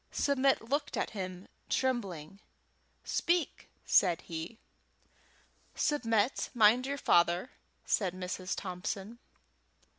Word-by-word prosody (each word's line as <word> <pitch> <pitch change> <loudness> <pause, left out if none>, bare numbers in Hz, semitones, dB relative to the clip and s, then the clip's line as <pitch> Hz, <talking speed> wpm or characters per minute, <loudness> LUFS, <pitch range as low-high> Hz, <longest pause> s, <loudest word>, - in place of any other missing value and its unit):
Submit 275 -3 +2
looked 285 +4 -1
at - - -1
him, 185 -2 -6 0.2
trembling. 195 - -2 0.6
"Speak," 345 -2 -1 0.2
said 175 -4 +4
he. 165 +6 -6 1.2
"Submit, 230 -5 +1
mind 235 +3 +5
your 280 +1 -2
father," 175 0 +3 0.3
said 185 -4 0
Mrs. 185 0 -4
Thompson. 195 +5 -5
210 Hz, 90 wpm, -31 LUFS, 180-260 Hz, 1.2 s, mind